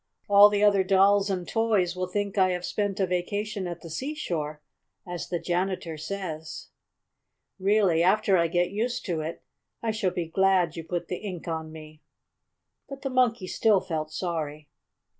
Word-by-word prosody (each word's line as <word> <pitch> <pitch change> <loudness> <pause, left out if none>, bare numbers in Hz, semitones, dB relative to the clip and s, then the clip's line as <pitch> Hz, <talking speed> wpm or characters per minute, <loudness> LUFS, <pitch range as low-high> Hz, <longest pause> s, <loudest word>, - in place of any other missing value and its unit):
All 205 0 +8
the 205 0 +1
other 200 -2 +5
dolls 195 +1 +4
and 180 -2 -2
toys 215 -6 +1
will 185 0 -2
think 200 +1 -2
I 190 -2 +4
have 180 0 -3
spent 205 -2 -2
a 190 - +3
vacation 200 +3 -2
at 175 -1 -6
the 165 - -9
seashore, 165 - -3 0.5
as 175 -2 -6
the 175 - -1
janitor 175 -1 -2
says. 160 -1 -6 0.9
Really, 195 -4 +3
after 195 +2 +3
I 170 -2 +3
get 175 +2 0
used 230 +4 -2
to 170 -5 -1
it, 160 +2 -6 0.4
I 225 - +1
shall 215 -3 0
be 175 -1 -3
glad 180 -1 +2
you 165 - -5
put 175 +1 -4
the 180 - -3
ink 185 -5 -7
on 160 -1 -4
me." 155 -1 -12 0.9
But 275 -1 -8
the 270 - -2
Monkey 245 -5 +2
still 210 +2 +3
felt 155 -3 -4
sorry. 155 -4 -4
185 Hz, 170 wpm, -27 LUFS, 165-205 Hz, 0.9 s, All